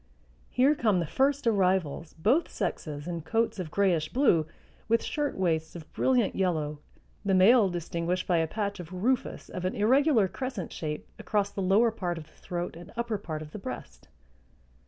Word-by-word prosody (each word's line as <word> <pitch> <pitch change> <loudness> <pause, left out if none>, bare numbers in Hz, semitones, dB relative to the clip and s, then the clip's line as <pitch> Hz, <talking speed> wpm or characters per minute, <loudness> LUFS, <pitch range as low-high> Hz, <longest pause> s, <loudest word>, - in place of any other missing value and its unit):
Here 265 +4 +4
come 215 -10 +2
the 170 - 0
first 275 - +1
arrivals, 185 -7 +1
both 240 - +2
sexes 150 -2 -4
in 170 -2 -3
coats 225 +6 0
of 175 -4 -4
grayish 170 -4 +1
blue, 175 - +3 0.4
with 230 +1 +2
shirtwaists 180 - -1
of 165 -3 -10
brilliant 250 -5 +2
yellow, 155 -6 0 0.4
the 195 -2 +2
male 200 +2 +6
distinguished 175 +1 -2
by 175 - +2
a 160 0 +2
patch 200 +1 -3
of 175 -1 -8
rufous 230 +8 -1
of 180 - -6
an 185 - -1
irregular 250 0 +4
crescent 250 -4 -5
shape 150 -2 -4
across 200 -1 0
the 200 - -4
lower 205 +5 +4
part 180 -6 -3
of 165 - -6
the - - -24
throat 175 -2 -5
and 170 +1 -11
upper 235 -3 -1
part 155 -5 -5
of 150 - -12
the 210 - -7
breast. 120 - -8
185 Hz, 175 wpm, -28 LUFS, 165-225 Hz, 0.4 s, male